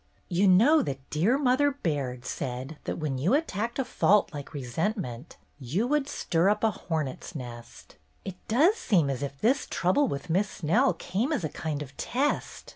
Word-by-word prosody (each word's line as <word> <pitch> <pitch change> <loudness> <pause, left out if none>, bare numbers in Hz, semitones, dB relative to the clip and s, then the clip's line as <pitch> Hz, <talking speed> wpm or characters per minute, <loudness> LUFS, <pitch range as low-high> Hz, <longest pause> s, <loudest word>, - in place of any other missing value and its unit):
"You 185 +3 +3
know 235 +13 +6
that 135 -1 -5
dear 190 - +2
Mother 280 +1 +3
Baird 140 - -3
said 130 +5 -5
that - - -3
when 145 -5 -2
you 180 - +3
attacked 235 - -2
a 270 - 0
fault 210 -5 +3
like 145 -2 -7
resent 150 - -2
ment, 125 - -7 0.2
you 150 - -1
would 290 +1 0
stir 170 +2 +1
up 210 - 0
a 220 - +4
hornet's 160 -3 -4
nest. 120 - -9 0.3
It 190 -2 -6
does 315 - +4
seem 170 - +2
as 135 - -4
if 140 -1 -5
this 260 - +2
trouble 190 +11 +2
with 140 - -4
Miss 190 +5 +1
Snell 210 - +2
came 225 - -2
as 280 - -1
a 155 - -1
kind 150 -1 -4
of 135 -1 -14
test. 275 +4 -2
180 Hz, 185 wpm, -27 LUFS, -, 0.3 s, know